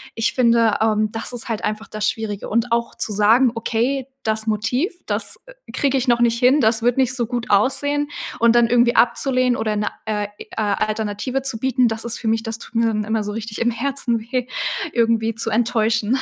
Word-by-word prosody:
ich 225 0 0
finde, 230 -3 +3
ähm, 215 -1 +2
das 225 +2 -4
ist 240 - -2
halt 225 -3 -3
einfach 215 +1 -3
das 215 0 -1
Schwierige 220 -4 -5
und 230 +2 0
auch 235 0 -1
zu 215 - -2
sagen: 225 +5 +4
„Okay, 245 +4 -1 0.2
das 220 0 0
Motiv, 230 - 0
das, - - -2
äh, - - -13 0.2
kriege 275 -1 +1
ich 260 0 -1
noch 240 -1 +3
nicht 235 -1 +3
hin, 255 +4 +4
das 225 0 +2
wird 245 +1 +2
nicht 255 -1 +2
so 240 -2 -1
gut 240 0 -4
aussehen.“ 285 +7 +2 0.3
Und 235 0 +4
dann 240 -1 +5
irgendwie 240 0 +3
abzulehnen 255 0 +2
oder 215 -1 -1
'ne, 210 - -1 0.2
äh 210 -1 -2
äh, - - -9
Alternative 215 +4 -1
zu 265 -4 -1
bieten, 255 0 +2
das 225 0 -3
ist 235 +1 -1
für 225 - -5
mich 225 0 +1
das 225 0 -4
tut 235 - -13
mir 230 0 +3
dann 215 -1 0
immer 220 0 -1
so 205 - -4
richtig 225 0 -6
im 235 +1 +2
Herzen 240 -1 -1
weh, 245 +2 -3 0.5
irgendwie 230 -1 +1
zu 225 0 -1
enttäuschen. 225 +1 +1
230 Hz, 210 wpm, -21 LUFS, 220-245 Hz, 0.5 s, dann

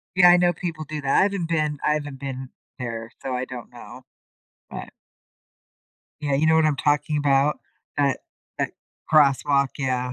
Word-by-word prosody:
Yeah, 180 -1 +7
I 175 - +8
know 175 0 +3
people 165 -2 -5
do 155 0 -5
that. 135 - +2
I - - +6
haven't 195 -4 0
been 155 -3 0
I 150 - +3
haven't 145 -3 -4
been 130 -1 -6 0.3
there, 115 -2 -5
so 130 -1 -3
I 125 - -1
don't 125 -2 -9
know. - - -12 0.7
But - - -7 1.3
Yeah, 145 -2 0
you 155 +3 +2
know 160 - +5
what 160 -1 +4
I'm 150 -2 +1
talking 145 +1 +1
about? 145 0 +2 0.4
That 140 -2 +2 0.4
that - - -1 0.4
crosswalk, 140 -2 +4
yeah. 125 -2 -1
145 Hz, 170 wpm, -24 LUFS, 135-155 Hz, 1.3 s, I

